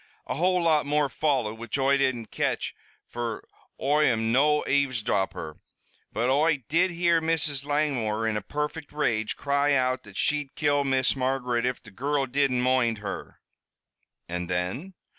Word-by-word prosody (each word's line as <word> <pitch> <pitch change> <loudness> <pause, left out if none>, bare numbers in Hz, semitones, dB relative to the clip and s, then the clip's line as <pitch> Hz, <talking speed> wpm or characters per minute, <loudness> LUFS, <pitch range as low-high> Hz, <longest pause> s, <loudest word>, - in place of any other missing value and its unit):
"A - - -3
whole 180 +5 +1
lot 155 -3 +3
more 145 -1 +2
followed, 120 -6 0
which 115 +3 -3
Oi 135 0 +3
didn't 130 -5 0
catch, - - -1 0.3
fer 120 -2 -4 0.4
Oi 150 +3 +3
am 115 -3 +1
no 150 +4 +3
avesdropper. 115 - -1 0.5
But 115 +3 0
Oi 145 -1 +2
did 175 +5 +3
hear 170 -1 +2
Mrs. 155 -4 0
Langmore, 130 -7 0
in 110 - 0
a 105 - -1
perfect 150 +7 -4
rage, 115 -7 0
cry 140 +1 +1
out 130 0 +1
that 100 -1 -12
she'd 145 -2 0
kill 145 -2 +2
Miss 130 -1 +1
Margaret 125 -2 0
if 125 - -3
the 110 - -13
girrul 140 +6 -1
didn't 130 -1 +1
moind 125 -3 +2
her." 105 -1 -7 0.9
"And 90 0 -4
then?" 95 - -3
135 Hz, 155 wpm, -26 LUFS, 115-150 Hz, 0.9 s, lot